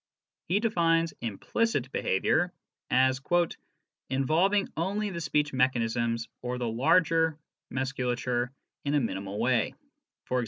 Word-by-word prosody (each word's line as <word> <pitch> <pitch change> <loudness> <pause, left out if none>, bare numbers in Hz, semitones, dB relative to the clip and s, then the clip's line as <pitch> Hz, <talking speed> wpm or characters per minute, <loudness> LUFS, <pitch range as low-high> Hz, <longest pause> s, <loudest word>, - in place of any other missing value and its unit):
He 190 +5 +2
defines 165 -7 +2
" - - -43
implicit 130 - -1
behaviour 160 - +1 0.2
" - - -64
as 130 +1 +3 0.5
" - - -51
involving 165 +10 +2
only 200 +5 -1
the 170 -2 -4
speech 150 -1 0
mechanisms 115 -2 +1
(or 125 0 -3
the 125 -1 -2
larger 160 +6 +3 0.3
musculature 125 -2 -1 0.3
in 145 +1 0
a - - +5
minimal 100 -4 -3
way; 120 -2 +1
e.g. 125 - -10
130 Hz, 125 wpm, -29 LUFS, 120-165 Hz, 0.5 s, a